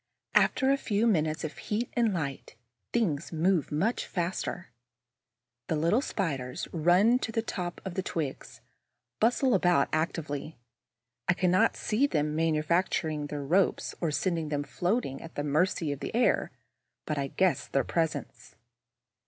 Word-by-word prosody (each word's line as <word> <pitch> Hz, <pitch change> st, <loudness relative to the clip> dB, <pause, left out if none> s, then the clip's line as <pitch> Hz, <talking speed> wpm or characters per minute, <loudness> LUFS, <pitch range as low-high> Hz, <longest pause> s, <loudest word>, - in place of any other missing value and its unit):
After 265 Hz, 0 st, +4 dB
a 275 Hz, -, +3 dB
few 215 Hz, -4 st, 0 dB
minutes 160 Hz, -7 st, +1 dB
of 155 Hz, -2 st, -5 dB
heat 225 Hz, +3 st, -2 dB
and 235 Hz, -3 st, +2 dB
light, 145 Hz, -7 st, -4 dB, 0.4 s
things 170 Hz, -10 st, 0 dB
move 170 Hz, 0 st, +1 dB
much 195 Hz, +11 st, 0 dB
faster. 175 Hz, -4 st, -3 dB, 1.0 s
The 160 Hz, -, 0 dB
little 170 Hz, -, +2 dB
Spiders 140 Hz, -, -3 dB
run 180 Hz, +9 st, +4 dB
to 225 Hz, -, -3 dB
the 225 Hz, 0 st, -1 dB
top 180 Hz, -5 st, -4 dB
of 190 Hz, -, -4 dB
the 190 Hz, -, -1 dB
twigs, 155 Hz, -7 st, -5 dB, 0.6 s
bustle 245 Hz, +3 st, +3 dB
about 175 Hz, -6 st, +3 dB
actively. 155 Hz, -1 st, -2 dB, 0.7 s
I 180 Hz, -, +5 dB
cannot 185 Hz, +5 st, +3 dB
see 230 Hz, +7 st, +1 dB
them 150 Hz, -, 0 dB
manufacturing 160 Hz, -1 st, +1 dB
the 145 Hz, 0 st, -4 dB
ropes 175 Hz, +7 st, +1 dB
or 165 Hz, -, +1 dB
sending 160 Hz, +1 st, -1 dB
them 145 Hz, -1 st, -1 dB
floating 175 Hz, -, -1 dB
at 165 Hz, -, -11 dB
the 145 Hz, -, -2 dB
mercy 155 Hz, +1 st, +1 dB
of 140 Hz, -, -4 dB
the -, -, -5 dB
air; 240 Hz, +1 st, +2 dB, 0.6 s
but 150 Hz, -2 st, -2 dB
I 140 Hz, -, -1 dB
guess 185 Hz, +5 st, +1 dB
their 135 Hz, -, +1 dB
presence. 145 Hz, -, -3 dB
170 Hz, 145 wpm, -29 LUFS, 150-195 Hz, 1.0 s, I